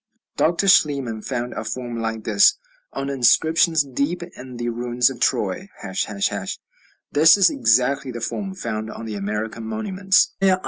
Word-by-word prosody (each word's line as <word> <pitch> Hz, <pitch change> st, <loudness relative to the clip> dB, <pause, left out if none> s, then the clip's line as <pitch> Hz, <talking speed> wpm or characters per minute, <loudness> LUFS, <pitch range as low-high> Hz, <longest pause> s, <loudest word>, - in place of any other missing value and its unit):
Dr. 175 Hz, +4 st, +1 dB
Schliemann 140 Hz, -, +3 dB
found 120 Hz, 0 st, -4 dB
a -, -, -5 dB
form 120 Hz, +1 st, -5 dB
like 110 Hz, -1 st, -3 dB
this 210 Hz, -, +4 dB, 0.3 s
on 135 Hz, -, -4 dB
inscriptions 155 Hz, +4 st, +3 dB
deep 140 Hz, +6 st, -2 dB
in 130 Hz, -7 st, -11 dB
the 120 Hz, 0 st, -2 dB
ruins 120 Hz, +1 st, 0 dB
of 125 Hz, -, -10 dB
Troy, 190 Hz, +9 st, -1 dB
###. -, -, -18 dB, 1.3 s
This 160 Hz, +5 st, +6 dB
is 195 Hz, -, +5 dB
exactly 135 Hz, -, +2 dB
the 120 Hz, -1 st, -6 dB
form 195 Hz, -, -4 dB
found 110 Hz, -, -4 dB
on 115 Hz, -, -8 dB
the 110 Hz, -, -5 dB
American 105 Hz, +3 st, -4 dB
monuments. 190 Hz, -, +1 dB
125 Hz, 145 wpm, -22 LUFS, 115-160 Hz, 1.3 s, This